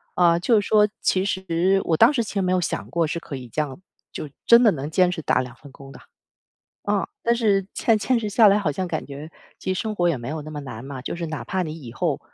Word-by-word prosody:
啊， 170 -1 +4
就 220 +5 +3
是 205 - -4
说， 210 -1 +5
其 185 - +1
实 190 -1 +1
我 165 - +2
当 230 - +6
时 240 -5 0
其 215 - -8
实 200 - 0
没 180 -1 0
有 185 - +3
想 175 - -3
过 170 -1 +1
是 165 +2 -3
可 155 - -8
以 130 -2 -8
这 155 - -1
样， 140 -1 -5 0.3
就 - - -6 0.2
真 235 +1 +8
的 220 - +6
能 145 -3 -4
坚 180 +2 +3
持 175 - -4
打 130 - +2
2 125 -1 -8
份 145 -2 -14
工 135 0 -13
的。 - - -12 0.8
啊， 205 -1 0 0.2
但 235 - +3
是 205 -5 +2
坚 225 -2 +2
坚 240 +3 +1
持 215 - -3
下 210 0 +6
来， 200 - +3
好 195 - 0
像 185 +6 -2
感 175 - -3
觉 145 +3 -9 0.3
其 185 - -2
实 185 - -3
生 215 -1 -3
活 175 -2 +2
也 160 - 0
没 120 0 -8
有 155 +2 -4
那 155 +1 -9
么 150 - -5
难 125 -5 -8
嘛， 135 -1 -7
就 130 - -5
是 170 -1 -4
哪 150 -6 -5
怕 185 +7 -1
你 160 -1 -6
以 120 -2 -9
后 110 - -1
175 Hz, 290 characters per minute, -23 LUFS, 145-205 Hz, 0.8 s, 真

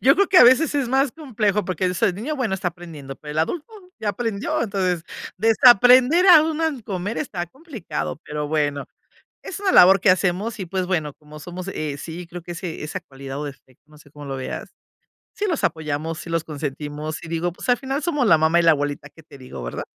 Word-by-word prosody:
Yo 270 +2 +6
creo 400 - +3
que 375 - +2
a - - +10
veces 285 +5 +5
es 270 -4 0
más 270 0 +2
complejo 215 - -1
porque 185 0 -1
eso 180 -1 0
de - - +3
niño, 260 - -4
bueno 245 -7 -1
está 190 -1 -2
aprendiendo, 160 -6 -10
pero 150 -1 -9
el 155 - -3
adulto 310 - -2 0.3
ya 210 -2 -1
aprendió, 225 -2 -2
entonces 185 -5 -1 0.3
desaprender 250 - +6
a 340 -5 +9
un 315 0 -2
mal 310 -8 -2
comer 200 +1 -4
está 180 - -4
complicado, 220 - -6
pero 150 0 -4
bueno. 145 -2 -1 0.6
Es 390 - -7
una 395 -2 +1
labor 190 - +7
que 185 - +4
hacemos 195 +5 0
y 190 - -5
pues 185 +1 -2
bueno, 155 -6 -2
como 150 0 -14
somos, 175 +4 -8
eh, 150 -6 -4
sí 170 +4 -8
creo 175 +1 -9
que 175 - -7
ese 170 -2 -6
esa 150 - -4
cualidad 135 +1 -9
o 150 - -4
defecto, 135 -2 -12
no 150 0 -19
sé 145 - -19
cómo 145 0 -11
lo 135 -1 -5
veas. 130 -1 -6 0.6
Sí 415 - -3
los 335 -6 -1
apoyamos, 155 0 -2
sí 170 - -8
los 165 -1 -1
consentimos 150 +1 -5
y - - -9
digo, 170 +2 -2
pues, 180 - -10
al 245 - +5
final 270 +3 -4
somos 295 -7 0
la 180 - +6
mamá 160 +2 +3
y - - +4
la 165 - +6
abuelita. 145 -1 -3
Qué 160 - -17
te 145 - -15
digo, 125 - -9
¿verdad? - - -5
180 Hz, 225 wpm, -22 LUFS, 150-245 Hz, 0.6 s, a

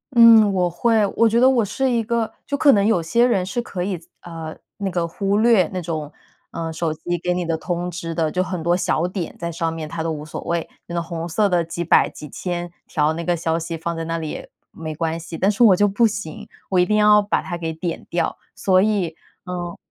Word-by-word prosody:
嗯， 225 -3 +8
我 180 -1 +1
会 220 +5 +2
我 230 -1 +4
觉 230 +2 +2
得 255 - +6
我 250 -4 +3
是 260 +6 -1
一 235 -2 +1
个 230 0 -1 0.2
就 285 - -2
可 285 -1 +6
能 200 -1 +3
有 210 -6 +3
些 235 +9 +3
人 195 -7 +1
是 240 +5 -2
可 190 -6 -6
以， 190 -1 -2 0.3
呃， 165 -2 -7 0.2
那 200 -2 -2
个 175 -1 -1
忽 195 +4 -1
略 220 -6 +4
那 185 - -2
种， 155 -3 -4 0.4
呃， 165 -1 -4
手 160 -1 -1
机 175 +2 -3
给 180 - +1
你 180 -1 -2
的 165 -1 0
通 175 +2 -3
知 165 -1 -5
的， 160 -1 0
就 185 +4 0
很 180 -3 -4
多 175 +2 +2
小 175 -1 0
点 180 -2 -4
在 170 0 -3
上 165 0 -2
面， 160 -1 -5
他 160 +1 -4
都 165 - -1
无 150 -1 -5
所 155 - -6
谓。 170 -1 -2 0.2
那 170 - -7
个 170 - 0
红 170 0 -5
色 205 +5 +2
的 175 -3 +2
几 170 +1 -4
百 - - +4
几 150 - -10
千 175 +3 -4 0.2
条 150 0 +1
那 170 +1 -4
个 175 0 0
消 165 0 0
息 165 0 -4
放 170 +1 -3
在 165 - -4
那 165 +1 -2
里 160 -2 -4
也 - - -8 0.2
没 160 -1 -6
关 165 +1 -2
系。 165 0 -7
但 195 - +2
是 215 +3 +2
我 215 -5 +8
就 205 - +4
不 215 +4 +2
行， 205 -8 -3 0.2
我 185 - +1
一 180 - +5
定 210 +3 +1
要 210 0 +6
把 205 - 0
它 175 - -5
给 165 -1 -3
点 165 +1 -5
掉， 175 - -1 0.2
所 185 -1 +3
以 195 -6 0 0.3
嗯， 175 -2 -5
175 Hz, 265 characters per minute, -21 LUFS, 165-205 Hz, 0.4 s, 嗯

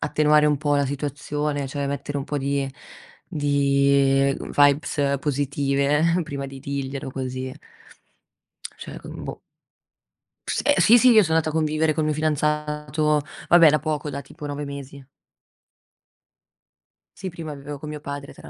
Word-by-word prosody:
attenuare 150 0 +3
un 150 -1 +3
po' 145 -1 +1
la 140 - +1
situazione, 145 +1 -3
cioè 140 0 -3
mettere 140 +1 -4
un 135 - -4
po' 145 - -3
di 140 0 -1 0.6
di, 140 -2 +3
ehm, - - -7
vibes 145 0 +3
positive 140 +1 0 0.2
prima 140 -2 -5
di 135 0 -10
dirglielo, 140 -1 -4
così. 130 0 -5 1.2
Cioè - - -8
con - - -9
boh. - - -7 1.1
S - - -1
ehm, 290 - +4
sì 230 +2 +7
sì, 250 +1 +6
io 220 -2 +7
so' 160 - -3
andata 160 -1 +2
a - - -6
convivere 155 0 +1
col 155 - -1
mio 155 - +1
fidanzato, 150 0 0 0.3
vabbè 170 -2 +8
da 150 - +2
poco, 150 -1 -3
da 140 0 -5
tipo 150 - -11
9 145 0 -4
mesi. 140 0 -8 2.1
Sì, 190 -1 -5
prima 160 -3 -7
vivevo 145 +1 -8
con 155 - -7
mio 150 -1 -6
padre 140 -1 -7
tra - - -13
145 Hz, 155 wpm, -23 LUFS, 140-150 Hz, 2.1 s, vabbè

